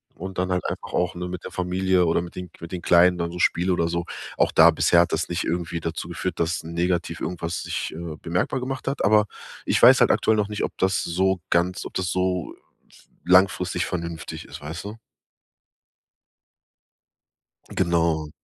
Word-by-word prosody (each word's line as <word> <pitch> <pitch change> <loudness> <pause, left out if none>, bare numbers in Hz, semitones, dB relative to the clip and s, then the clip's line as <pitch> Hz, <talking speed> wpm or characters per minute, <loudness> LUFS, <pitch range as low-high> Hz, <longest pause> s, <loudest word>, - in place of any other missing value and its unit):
und 95 +1 -7
dann 90 0 -1
halt 90 - 0
einfach - - -5
auch, 90 0 0
ne, 90 0 -4
mit 90 0 -6
der - - -6
Familie 90 0 +1
oder 85 +1 +2
mit 85 - -9
den 90 -2 -7
mit 85 +1 -9
den 90 -2 -5
Kleinen 90 +1 +5
dann 85 0 -2
so 90 - -7
spiele 90 +2 +2
oder 85 -1 +1
so. 85 0 -2 0.3
Auch - - +3
da - - +7
bisher 85 - +3
hat 85 0 +3
das 80 - -1
nicht 85 0 -2
irgendwie 85 0 -2
dazu 80 0 -4
geführt, - - -4
dass 85 0 -1
negativ 85 0 -2
irgendwas 85 -1 -4
sich, - - -4
äh, 85 -2 -6
bemerkbar 90 +9 -1
gemacht 130 +1 -5
hat. 135 0 -1
Aber 105 +1 +5 0.4
ich - - +1
weiß - - +8
halt - - +5
aktuell 110 -1 +2
noch 105 0 0
nicht, 105 - -3
ob - - -4
das 95 -1 +1
so 95 +2 +1
ganz 90 +2 +1
ob - - -9
das 90 -2 -1
so 90 -2 -1 0.7
langfristig 90 -1 +3
vernünftig 85 -2 -5
ist, 75 0 -10
weißt 80 +4 -6
du? 105 +2 -7 2.8
Genau. 85 -3 +1
90 Hz, 185 wpm, -24 LUFS, 85-95 Hz, 2.8 s, weiß